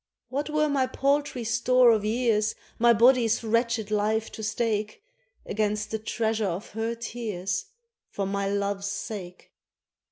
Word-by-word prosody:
What 285 +4 -2
were 305 0 +2
my 275 -3 +1
paltry 275 -1 0
store 240 +2 +4
of 215 -2 +2
years, 220 -1 +1 0.2
My 235 +1 +6
body's 235 0 +4
wretched 230 -1 0
life 215 +1 0
to - - -8
stake, 215 -1 -2 0.4
Against 210 0 -1
the 220 - -2
treasure 220 -1 -1
of 180 +5 -5
her 225 +2 -2
tears, 215 -6 -3 0.4
For 200 - -3
my 200 0 -1
love's 200 0 -1
sake 190 -3 -7
220 Hz, 135 wpm, -26 LUFS, 210-240 Hz, 0.4 s, My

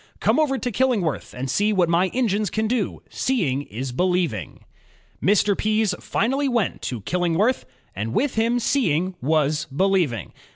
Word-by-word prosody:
Come - - +2
over 280 -3 +2
to 250 -1 -3
Killingworth 220 - 0
and 130 +2 -3
see 205 +10 +1
what 185 -4 +3
my 170 +3 +3
engines 215 -3 0
can 220 0 -1
do; 230 -3 -2
seeing 170 - 0
is 130 0 -6
believing." 175 - -1 0.6
Mr. 205 +1 +3
Pease 215 -1 +1
finally 270 +4 0
went 235 -5 0
to 120 -4 -4
Killingworth 180 - +1 0.3
and 105 +4 -3
with 260 - 0
him 230 +2 +1
seeing 185 - +1
was 150 +1 +1
believing. 155 - 0
190 Hz, 150 wpm, -23 LUFS, 150-230 Hz, 0.6 s, what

